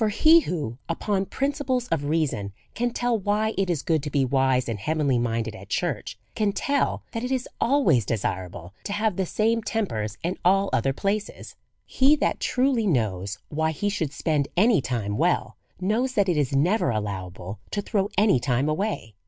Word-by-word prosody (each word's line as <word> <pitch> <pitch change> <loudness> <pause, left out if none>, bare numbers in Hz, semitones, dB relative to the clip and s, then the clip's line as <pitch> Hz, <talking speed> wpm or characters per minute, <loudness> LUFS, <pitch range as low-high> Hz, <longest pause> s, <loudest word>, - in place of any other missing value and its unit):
For 215 - +3
he 315 +10 +6
who, 150 - -4
upon 195 +3 -1
principles 270 -3 -1
of 165 -3 0
reason^ 145 -10 -1 0.2
can 245 +1 0
tell 240 0 0
why 210 +2 0
it 195 -1 0
is 160 -5 -1
good 160 -3 +1
to 150 - -4
be 140 -2 +1
wise 130 -1 +2
and 115 -3 -3
heaven 155 +7 -1
ly 130 -3 +3
minded 115 -1 -1
at - - -12
church, - - -2 0.2
can 210 -2 0
tell 280 +6 0
that 230 -1 -4
it 250 - -3
is 260 -1 -1
always 230 - +3
desirable 95 -4 -3
to 200 - -2
have 210 -1 0
the 190 -1 -1
same 225 +4 +1
tempers 165 - -2
in 175 +2 -2
all 195 +2 +3
other 135 +4 +2
places. 200 +8 -3 0.3
He 275 +3 +4
that 295 - 0
truly 250 -4 +1
knows 105 - 0
why 160 +1 0
he 180 +6 -1
should 160 -8 -2
spend 145 -1 0
any 215 - +5
time 105 -5 -2
well, - - +1 0.2
knows 225 +7 0
that 200 -4 +2
it 175 - +2
is 140 -2 0
never 180 +11 +2
allowable 100 -3 -4
to 205 - -2
throw 200 -2 0
any 200 - +4
time 130 +2 0
away. 155 - -2
170 Hz, 185 wpm, -25 LUFS, -, 0.3 s, he